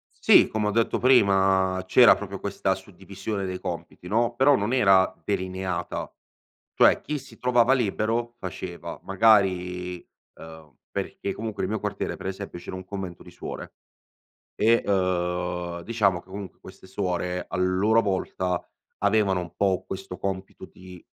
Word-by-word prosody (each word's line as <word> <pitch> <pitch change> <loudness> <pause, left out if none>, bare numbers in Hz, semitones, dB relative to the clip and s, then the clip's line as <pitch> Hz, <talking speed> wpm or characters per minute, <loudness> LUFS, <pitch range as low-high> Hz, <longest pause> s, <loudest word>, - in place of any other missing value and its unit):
Sì, - - +6
come 110 -1 -1
ho - - +1
detto 115 +2 +1
prima, 95 -6 +3
c'era 125 +4 +7
proprio 100 -1 -7
questa 95 -1 -1
suddivisione 95 +1 -6
dei 90 0 -4
compiti 90 - -7
no. 115 +4 +1
Però 135 +3 +5
non 105 +2 -1
era 95 -6 +4
delineata. 95 -2 -3 0.6
Cioè, - - +5
chi 150 0 -3
si 135 - -14
trovava 125 0 +3
libero 120 0 0
faceva, 90 -2 -7
magari, 90 -3 +2 0.3
ehm, 80 -4 -13
perché 100 - -4
comunque 110 -2 -5
nel 95 - -2
mio 110 - -2
quartiere 105 -1 -3
per - - -8
esempio 95 -1 -5
c'era 90 - -7
un 95 - -8
convento 95 -2 -7
di - - -14
suore. - - -8 0.8
E, 115 +2 +4
uhm, 90 -2 -1
diciamo 100 -3 +1
che - - -26
comunque 95 -1 -8
queste - - -14
suore, 90 -2 -2
a - - -4
loro 95 +5 +3
volta 95 -2 -1 0.4
avevano 100 -2 +2
un 85 -1 -8
po' 95 -2 +1
questo 95 -1 -6
compito 95 -1 -5
di, 90 -1 -14
95 Hz, 145 wpm, -25 LUFS, 90-105 Hz, 0.8 s, c'era